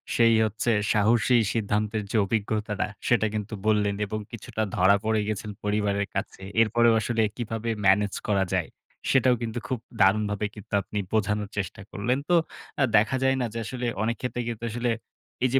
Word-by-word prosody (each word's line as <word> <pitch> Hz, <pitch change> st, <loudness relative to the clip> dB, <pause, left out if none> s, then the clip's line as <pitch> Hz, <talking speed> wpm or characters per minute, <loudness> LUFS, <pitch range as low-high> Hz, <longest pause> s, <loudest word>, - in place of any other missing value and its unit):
সেই 115 Hz, -1 st, +5 dB
হচ্ছে 110 Hz, +2 st, -1 dB, 0.2 s
সাহসী 115 Hz, +4 st, +4 dB, 0.2 s
সিদ্ধান্তের 105 Hz, 0 st, -1 dB
যে -, -, +1 dB
অভিজ্ঞতাটা 105 Hz, 0 st, -1 dB, 0.2 s
সেটা 115 Hz, -2 st, +3 dB
কিন্তু 105 Hz, 0 st, -4 dB
বললেন 105 Hz, -2 st, +2 dB
এবং 110 Hz, +1 st, -4 dB
কিছুটা 110 Hz, -1 st, -5 dB
ধরা 95 Hz, +2 st, +5 dB
পড়ে 110 Hz, -1 st, +2 dB
গেছেন 105 Hz, 0 st, -3 dB
পরিবারের 105 Hz, -1 st, 0 dB
কাছে। 100 Hz, 0 st, -4 dB, 0.2 s
এরপরেও 115 Hz, +1 st, +4 dB
আসলে 115 Hz, +1 st, 0 dB, 0.2 s
কীভাবে 115 Hz, -1 st, -3 dB, 0.2 s
ম্যানেজ 95 Hz, +1 st, +4 dB
করা 100 Hz, -2 st, +2 dB
যায়? 90 Hz, -3 st, 0 dB, 0.4 s
সেটাও 130 Hz, -1 st, +4 dB
কিন্তু 115 Hz, 0 st, -3 dB
খুব 130 Hz, -3 st, -2 dB, 0.2 s
দারুণভাবে 105 Hz, +1 st, +3 dB
কিন্তু 105 Hz, -1 st, -12 dB
আপনি 105 Hz, +2 st, -4 dB
বোঝানোর 105 Hz, -1 st, 0 dB
চেষ্টা 100 Hz, +2 st, -3 dB
করলেন। 120 Hz, +6 st, 0 dB
তো 175 Hz, -, +5 dB, 0.5 s
আ -, -, +6 dB
দেখা 110 Hz, +5 st, +2 dB
যায় 135 Hz, 0 st, +3 dB
না। -, -, +1 dB
যে 115 Hz, -, -3 dB
আসলে, 125 Hz, +2 st, -4 dB, 0.2 s
অনেক 115 Hz, +1 st, 0 dB
ক্ষেত্রে 125 Hz, -1 st, -2 dB
কিন্তু 115 Hz, -1 st, -6 dB
আসলে 120 Hz, +1 st, 0 dB, 0.5 s
এই -, -, +3 dB
যে -, -, +6 dB
110 Hz, 170 wpm, -26 LUFS, 105-115 Hz, 0.5 s, আ